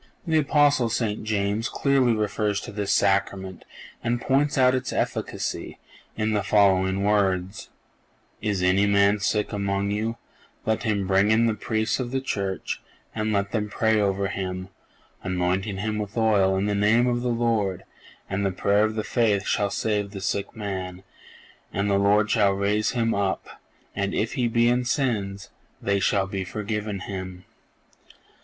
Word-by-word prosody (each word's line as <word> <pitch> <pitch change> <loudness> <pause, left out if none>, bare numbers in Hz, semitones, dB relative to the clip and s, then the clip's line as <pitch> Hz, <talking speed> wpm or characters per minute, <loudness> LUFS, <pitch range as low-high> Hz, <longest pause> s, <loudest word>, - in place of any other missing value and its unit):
The 160 -2 +2
Apostle 145 -4 +3
St. 110 -2 -1
James 105 +1 0
clearly 135 -4 +2
refers 105 -1 0
to - - -8
this 100 -1 -2
Sacrament 95 -1 0 0.4
and 120 0 0
points 140 +3 +1
out 130 -1 +5
its 130 +1 -2
efficacy - - -3 0.4
in 110 0 0
the 105 - +1
following 95 -1 +3
words: 100 -1 0 0.7
"Is 100 -4 -1
any 95 +3 +3
man 100 +1 +4
sick 105 +2 0
among 100 0 -1
you; 110 +3 -2 0.5
let 110 0 0
him 105 -4 0
bring 95 +2 +3
in 110 +2 +4
the 115 - +2
Priests 110 +2 -1
of 125 -2 -2
the 135 +1 -1
Church, 100 -7 -3 0.3
and 110 0 -1
let 100 -1 0
them 105 -2 -1
pray 110 0 +2
over 100 -1 0
him, 95 -1 -4 0.5
anointing 95 +2 -1
him 105 +2 -2
with 105 +2 -5
oil 100 -4 +3
in 95 - 0
the 105 - 0
name 105 +4 +3
of 120 -1 0
the 125 - -1
Lord, 115 -6 0 0.4
and 100 +1 -2
the 100 - +2
prayer 100 +3 +2
of 110 0 -3
faith 105 -5 +1
shall 100 -1 +1
save 105 0 -1
the 100 0 -7
sick 100 +4 -2
man; 95 -3 -5 0.7
and 100 +1 -1
the 100 - +3
Lord 105 +2 +3
shall 100 -4 +3
raise 105 +3 0
him 115 -2 +1
up; 95 -4 -3 0.3
and 100 0 -1
if 110 - -1
he 125 -4 +1
be 115 0 +2
in 125 +1 +2
sins, 105 -7 -2 0.3
they 100 0 0
shall 100 0 +2
be 95 0 -4
forgiven 105 +1 -4
him." 95 -1 -7
105 Hz, 160 wpm, -25 LUFS, 100-110 Hz, 0.7 s, out